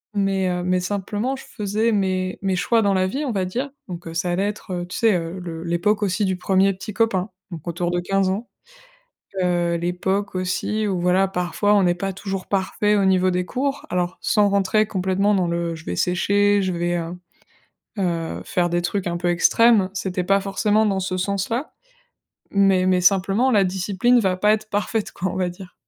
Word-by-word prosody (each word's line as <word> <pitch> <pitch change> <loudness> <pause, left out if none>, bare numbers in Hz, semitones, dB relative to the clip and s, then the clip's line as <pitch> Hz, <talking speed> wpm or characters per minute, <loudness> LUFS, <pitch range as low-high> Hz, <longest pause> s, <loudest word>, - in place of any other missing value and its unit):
Mais 195 -2 +1
heu, 180 0 -2
mais 180 0 +1
simplement 205 +7 -2
je - - -10
faisais 210 +2 -1
mes 185 -3 -1
mes 195 -1 0
choix 225 +5 +2
dans 200 -1 +2
la 185 0 +2
vie, 275 +10 -3
on 255 - -1
va 190 -3 -1
dire. 250 +10 -3 0.2
Donc 175 -3 -7
heu, 165 - -6
ça 175 +2 0
allait 195 +3 0
être, 210 -1 -6
heu, 175 -1 -3
tu 180 - -6
sais, 225 -2 +4
heu 170 +2 -3
le 165 -2 -6
l'époque 175 +5 0
aussi 205 +1 0
du 190 -1 0
1er 190 +1 +2
petit 200 +3 -8
copain, 210 -3 +1 0.2
donc 170 -1 -8
autour 175 +1 -2
de 175 - 0
15 195 +1 +1
ans. 205 +6 -3 0.9
Heu, 175 -1 +1
l'époque, 190 +3 -2
aussi, 185 +4 -1
où 190 -3 -1
voilà, 180 +2 +3
parfois, 190 +3 0
on 195 -3 +4
est 175 - +3
pas 195 +2 -3
toujours 195 0 -5
parfait 205 +2 +1
au 200 -1 +2
niveau 185 -1 +3
des 180 0 -1
cours, 275 +6 -2
alors 180 -1 -1
sans 205 -1 +3
rentrer 200 +2 +2
complètement 190 +1 +1
dans 185 -2 +1
le: 170 0 -2
«Je 160 - -12
vais 90 - -3
sécher, 200 - +2
je 185 -2 -1
vais, 175 0 -1
heu 170 +1 -4 0.8
heu, 170 -4 -2
faire 175 -1 0
des 175 0 0
trucs 190 +2 -2
un 170 0 -2
peu 175 0 -1
extrêmes», 200 +3 +4
c'était 185 -2 -2
pas 195 +2 +2
forcément 205 +2 +1
dans 195 -2 +1
ce 185 0 -2
sens-là. 200 +8 -2 0.8
Mais 195 -2 +3
mais 185 -1 +3
simplement, 195 +7 +3
«La 205 -3 +4
discipline 195 +6 +2
va 190 -4 +1
pas 210 +3 +3
être 215 0 -3
parfaite», 210 +1 -1
quoi, 185 0 -3
on - - -6
va 185 -1 0
dire. 180 +1 -11
190 Hz, 205 wpm, -22 LUFS, 180-205 Hz, 0.9 s, sais